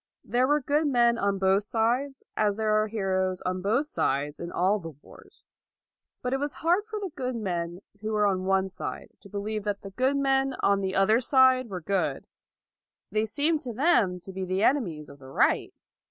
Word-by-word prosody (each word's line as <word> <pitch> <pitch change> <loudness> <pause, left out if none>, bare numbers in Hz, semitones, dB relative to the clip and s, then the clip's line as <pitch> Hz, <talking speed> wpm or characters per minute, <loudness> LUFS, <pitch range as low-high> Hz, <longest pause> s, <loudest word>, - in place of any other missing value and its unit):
There 250 +2 +1
were 295 +1 +2
good 295 +3 +1
men 240 -3 +3
on 200 0 +1
both 190 +1 +3
sides, 240 +6 -1
as 210 -2 +1
there 215 0 0
are 215 - -1
heroes 190 -3 -1
on 185 0 -2
both 225 +10 +1
sides 145 - -1
in 170 0 -6
all 195 +4 +1
the 165 -3 -7
wars. - - -17 0.8
But 250 +1 -1
it 270 - 0
was 285 -1 -2
hard 365 +6 +3
for 435 -1 -4
the 390 -4 -5
good 255 -1 -3
men 175 -4 -3 0.2
who 215 +1 -4
were 210 -1 +2
on 190 -2 0
one 190 0 +2
side 185 -1 -6
to 200 - -15
believe 210 +1 -3
that 205 -1 -2
the 195 - -8
good 260 +7 +1
men 270 -1 +1
on 200 0 +3
the 190 -1 -2
other 215 +4 +4
side 260 -1 +4
were 185 -3 -5
good: 195 +3 -1 0.9
they 215 +1 0
seemed 300 +6 +1
to 245 -5 -5
them 225 - +2
to 190 - -9
be 190 0 -4
the 185 +2 -1
enemies 175 - +1
of 140 - -14
the 130 -1 -12
right. - - +2
215 Hz, 200 wpm, -27 LUFS, 190-260 Hz, 0.9 s, other